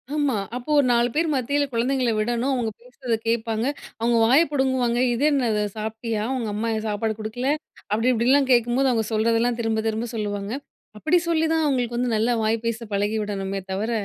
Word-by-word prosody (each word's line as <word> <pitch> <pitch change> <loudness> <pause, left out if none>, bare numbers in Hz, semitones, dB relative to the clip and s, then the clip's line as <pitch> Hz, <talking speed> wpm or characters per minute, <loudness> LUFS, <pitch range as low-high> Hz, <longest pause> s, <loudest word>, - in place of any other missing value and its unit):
ஆமா. 290 -5 +1 0.2
அப்போ 250 +4 -7
ஒரு 275 - +3
4 235 +1 +3
பேர் 325 +2 +2
மத்தியில 285 +3 +1
குழந்தைங்களை 250 +1 +1
விடணும், 240 +4 0
அவங்க 230 -3 -1
பேசுறத 250 -2 -3
கேட்பாங்க. 225 0 0 0.3
அவுங்க 235 0 +2
வாய 265 +7 +6
பிடுங்குவாங்க. 260 -4 +1
"இது 240 +5 -1
என்னது 235 -7 +1 0.2
சாப்பிட்டியா? 220 0 -3
உங்க 235 -4 -2
அம்மா 215 +3 -2
ஏன் 220 0 -3
சாப்பாடு 215 +1 -1
குடுக்கல?" 225 +5 -3 0.4
அப்படி, 225 +4 +1
இப்படிலாம் 260 +4 +3
கேட்கும்போது 245 +2 +3
அவங்க 225 -3 0
சொல்றதெல்லாம் 230 +2 +2
திரும்ப-திரும்ப 225 0 -1
சொல்லுவாங்க. 205 -1 -3 0.5
அப்படி 315 +10 +2
சொல்லி 320 -1 +2
தான் 320 0 +2
அவுங்களுக்கு 245 -4 0
வந்து 245 0 0
நல்லா 225 +3 +2
வாய் 220 +1 +2
பேச 230 0 -2
பழகி 205 +2 0
விடணுமே 195 -1 -3
தவிர, 210 +5 -2
235 Hz, 170 wpm, -23 LUFS, 220-255 Hz, 0.5 s, வாய